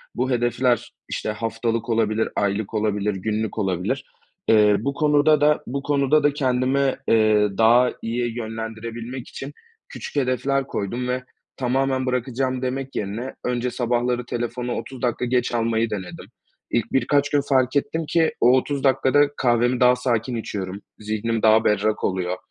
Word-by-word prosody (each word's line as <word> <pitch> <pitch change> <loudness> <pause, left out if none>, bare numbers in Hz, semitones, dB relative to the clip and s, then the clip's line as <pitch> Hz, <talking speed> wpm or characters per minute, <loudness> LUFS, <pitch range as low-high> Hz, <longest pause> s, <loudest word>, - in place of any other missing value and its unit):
Bu 130 +2 -1
hedefler, 120 0 +1 0.2
işte, - - -3
haftalık 115 +1 -2
olabilir, 110 -1 +1
aylık 100 +1 -1
olabilir, 105 -1 0
günlük 110 +3 -2
olabilir. 95 -3 -1 0.4
Eee, 105 -2 +5
bu 140 0 -2
konuda 150 +1 +3
da, 150 0 +3
bu 140 +3 -3
konuda 145 +1 +2
da 145 - +3
kendimi, 130 0 +1
eee, 110 -2 +4
daha 120 +3 +5
iyi 120 +1 -2
yönlendirebilmek 115 +2 -6
için 135 +2 -8 0.4
küçük - - -8
hedefler 135 0 0
koydum 120 +5 -3
ve 125 0 -2 0.3
tamamen 130 +1 0
bırakacağım 130 +1 -1
demek 135 +1 -3
yerine 110 +6 -4
önce 125 0 -1
sabahları 120 0 0
telefonu 120 +1 -3
30 125 +2 -7
dakika 125 0 0
geç 125 0 0
almayı 115 -1 +1
denedim. 95 -4 -6 0.5
İlk 120 -3 0
birkaç 140 +1 +2
gün 145 - +2
fark 130 0 +2
ettim 160 +3 0
ki 165 -1 +3
o 120 - +6
30 140 +1 -2
dakikada 135 +1 +3 0.2
kahvemi 120 0 +2
daha 125 0 +5
sakin 125 -1 -1
içiyorum. 100 -3 -5 0.2
Zihnim 110 +1 -2
daha 110 0 +5
berrak 105 +1 +1
oluyor, 90 -1 -1
120 Hz, 145 wpm, -23 LUFS, 110-130 Hz, 0.5 s, o